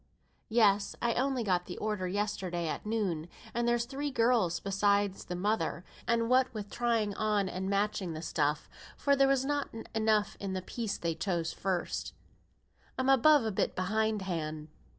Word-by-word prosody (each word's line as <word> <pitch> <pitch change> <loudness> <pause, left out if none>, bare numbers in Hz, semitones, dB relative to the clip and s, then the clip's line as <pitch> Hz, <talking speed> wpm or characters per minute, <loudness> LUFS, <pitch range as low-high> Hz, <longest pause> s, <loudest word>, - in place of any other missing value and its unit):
"Yes, 210 -3 +3
I 235 -1 +1
only 260 0 0
got 180 -4 0
the 175 - -6
order 210 -3 -2
yesterday 190 -3 -2
at 160 - -4
noon; 185 -7 -1 0.2
and 235 0 0
there's 240 0 +2
three 280 +3 -3
girls 230 -8 +2
beside 200 0 +2
the 180 -2 -7
mother; 180 -3 -1 0.2
and 230 -1 +2
what 255 +1 +3
with 205 -1 -6
trying 230 -4 +1
on 210 -2 +1
and 185 +1 -3
matching 200 -3 0
the 155 +1 -6
stuff 150 -2 0 0.3
(for 280 -1 +3
there 275 0 +4
was 270 -1 +2
not 290 0 -1 0.2
enough 215 -2 +1
in 195 -1 -3
the 185 -1 -3
piece 220 0 -3
they 170 -1 -1
chose 170 -1 -2
first), 185 -2 -2 0.8
I'm 260 +1 +1
above 270 0 +6
a 220 - 0
bit 190 - -1
behindhand. 185 -6 -1
205 Hz, 165 wpm, -31 LUFS, 185-235 Hz, 0.8 s, above